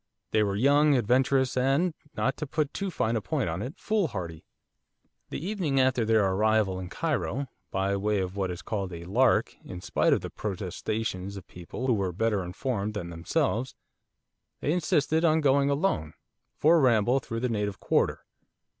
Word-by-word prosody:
They 110 - +3
were 100 -2 +1
young, 145 +6 +4
adventurous, 130 +2 +2
and 135 +7 +2 0.2
not 135 - +1
to 150 - -4
put 150 +1 -1
too 195 -1 -2
fine 115 -9 -1
a 110 - 0
point 95 - -1
on 85 +4 -3
it 130 +8 -5
foolhardy. 100 - -2 0.8
The - - -4
evening 180 -9 0
after 130 -3 +2
their 110 -2 +3
arrival 100 0 +2
in 90 -1 -6
Cairo, 140 - -2 0.2
by 95 +1 0
way 105 +1 0
of 95 0 -3
what 95 -2 -1
is 90 -1 -6
called 100 -4 -3
'a 85 0 -7
lark,' 120 +7 +2
in 90 - -8
spite - - +1
of - - +3
the - - -6
protestations 100 0 -4
of 95 - -9
people 90 +8 -7
who 130 - +3
were 100 -4 0
better 105 +1 0
informed 105 +3 -3
than 85 -4 -4
themselves, 125 - -1 0.8
they 150 - 0
insisted 160 -1 +1
on 160 -1 +4
going, 140 -1 +3
alone, 140 - 0 0.4
for 165 +3 +5
a - - +3
ramble 120 0 +3
through 115 -2 -5
the 125 - +1
native 105 -4 -2
quarter. - - +1
115 Hz, 175 wpm, -28 LUFS, 95-140 Hz, 0.8 s, for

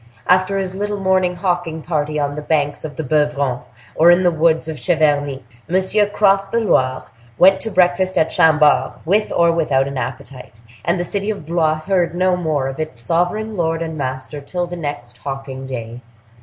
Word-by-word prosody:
After 185 +2 +2
his 190 -1 -3
little 205 +1 -3
morning 185 -2 +1
hawking 175 -3 -2
party 150 -2 -2
on 145 -1 -1
the 150 - -5
banks 145 -2 -1
of 150 -3 -7
the 160 - -4
Beuvron, 145 -3 0 0.3
or 165 +2 +5
in 175 +1 +5
the 175 - +4
woods 160 0 +1
of 160 -2 -5
Cheverny, 145 -5 +1 0.3
Monsieur 190 +3 +2
crossed 195 -1 +2
the 230 - +1
Loire, 130 - +1 0.3
went 190 +1 +5
to 225 - -4
breakfast 185 -1 +2
at 160 0 +2
Chambord, 155 -2 +4
with 210 +5 +1
or 170 0 +3
without 145 -5 +1
an 140 -1 -4
appetite, 125 -1 -7 0.2
and 175 +2 0
the - - 0
city 200 +4 -3
of 205 -7 -4
Blois 155 -1 0
heard 175 -1 0
no 185 0 +2
more 155 -6 -1
of 135 +2 -6
its 155 -5 -3
sovereign 180 - -1
lord 165 -2 -1
and 160 -1 -5
master 130 +1 -5
till 175 +5 -3
the 175 0 -7
next 145 -7 -6
hawking 135 -1 -6
day. 120 -2 -6
160 Hz, 185 wpm, -19 LUFS, 145-185 Hz, 0.3 s, or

